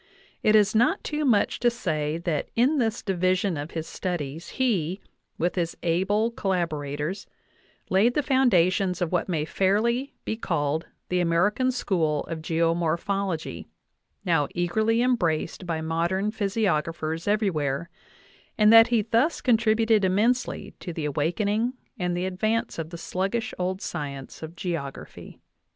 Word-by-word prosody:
I - - -1
It 215 - +6
is 210 -1 +4
not 230 +2 +2
too 300 0 -2
much 220 -6 +2
to 240 - +4
say 155 -10 -2
that 170 -3 -2
in 270 +6 +3
this 225 -2 0
division 185 -1 +1
of 145 +1 -5
his 160 - -3
studies/ne, 175 - -2 0.4
with 175 +2 0
his 170 -2 -2
able 195 +7 +1
collabo 185 -6 0
rators, 150 +5 -4 0.6
laid 210 +6 +3
the 295 - +2
foundations 190 -9 +3
of 175 -3 -1
what 180 +1 0
may 165 -4 0
be - - -3
fairly 225 - +1 0.3
called 155 -1 -1 0.2
the 180 - +1
American 185 +9 +2
school 165 - 0
of 165 -1 -6
geomorphology, 165 - -1 0.6
now 165 -5 +2
eagerly 220 +7 +1
embraced 180 -7 0
by 165 -2 -2
modern 170 +6 0
physiographers 170 -6 -1
everywhere, 170 -8 0 0.7
and 215 0 +6
that 225 +1 +9
he 235 -3 +2
thus 230 +9 +1
con 245 -3 +4
tributed 220 -1 +2
immensely 220 +7 +1
to 175 - -6
the 160 -2 -3
awakening 200 - 0 0.3
and 180 -1 -1
the 180 - -1
advance 215 +4 -1
of 160 -1 -4
the 170 - -7
sluggish 195 +7 -2
old 185 +2 -2
science 140 -2 -6
of 160 +1 -8
geography. 165 -6 -6
185 Hz, 140 wpm, -26 LUFS, 165-220 Hz, 0.7 s, that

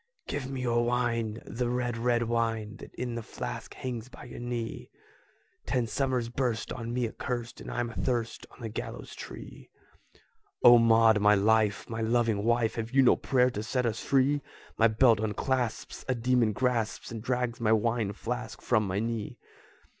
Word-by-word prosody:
"Give 135 -2 -4
me 135 -1 -4
your 120 -1 +2
wine, 120 -2 -1
the 120 0 -2
red, 120 -1 -1
red 120 0 +1
wine, 115 -2 -1
That - - -11
in 125 -1 -3
the 115 - -3
flask - - -6
hangs 125 -2 -5
by - - -12
your 120 - -9
knee! 120 -2 -4 0.8
Ten 125 -2 +1
summers 125 0 -1
burst 120 -2 -2
on 115 0 -5
me 120 -1 0
accurst, 120 +1 -5
And - - -8
I'm 120 -1 -2
athirst 120 -1 -2
on - - -17
the 115 - -4
gallows 110 - -6
tree." - - -10 0.9
"O 120 0 +9
Maud, 115 -1 +5
my 105 +1 +5
life! 105 +1 +2
my 115 0 -4
loving 115 -2 +1
wife! 115 0 +2
Have 115 0 -3
you 135 +2 +4
no 125 - +6
prayer 125 -2 +2
to 105 - -4
set 125 +3 -1
us 115 -1 -1
free? 140 +2 +2 0.3
My 115 - +5
belt 115 0 +4
unclasps, 115 +3 -2
a 130 - +1
demon 120 -1 +2
grasps 115 0 -1
And 115 -2 -5
drags 125 0 -1
my 110 -1 +2
wine 110 -1 +1
flask 115 0 -5
from 110 -4 +1
my 95 +1 -2
knee!" 115 -1 -3
115 Hz, 175 wpm, -29 LUFS, 110-125 Hz, 0.9 s, O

